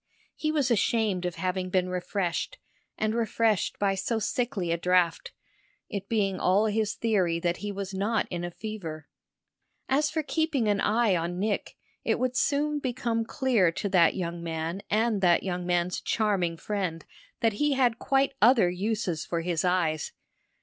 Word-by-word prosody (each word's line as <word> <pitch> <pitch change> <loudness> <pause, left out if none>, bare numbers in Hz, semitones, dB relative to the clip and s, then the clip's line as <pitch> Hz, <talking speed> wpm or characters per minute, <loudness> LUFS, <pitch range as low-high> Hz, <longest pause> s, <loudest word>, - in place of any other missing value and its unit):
He 310 - -1
was 285 -5 +1
ashamed 210 -4 +1
of 175 - -5
having 185 0 -2
been 185 0 +1
refreshed, 180 - -2 0.4
and 215 0 0
refreshed 225 -4 +1
by 200 -1 +1
so 210 +4 -1
sickly 215 -5 -1
a 170 - +1
draught 180 -1 +2 0.6
it 200 -1 -5
being 200 -4 0
all 195 +4 +3
his 215 -1 0
theory 185 -7 +1
that 175 0 0
he 205 0 -4
was 195 -1 -5
not 205 +4 0
in 175 -1 -3
a 175 - -2
fever. 170 -6 -7 0.8
As 295 +3 +2
for 315 +1 -2
keeping 300 -6 0
an 205 -1 +2
eye 220 -2 +3
on 170 +1 -2
Nick, 205 +2 -2 0.3
it - - +1
would 255 0 -1
soon 295 +2 +1
become 240 -4 -1
clear 235 - +2
to 200 - -2
that 175 -4 +4
young 170 -2 -3
man 165 +2 -3
and 215 -1 +1
that 175 -2 +4
young 180 -2 -3
man's 175 0 0
charming 195 -6 0
friend 185 -5 -3 0.4
that 225 -2 +3
he 295 -1 +3
had 245 -4 +2
quite 275 0 +2
other 225 -6 +5
uses 190 -3 -2
for 170 -1 -2
his 170 -1 -1
eyes. 170 -4 0
200 Hz, 165 wpm, -27 LUFS, 175-230 Hz, 0.8 s, other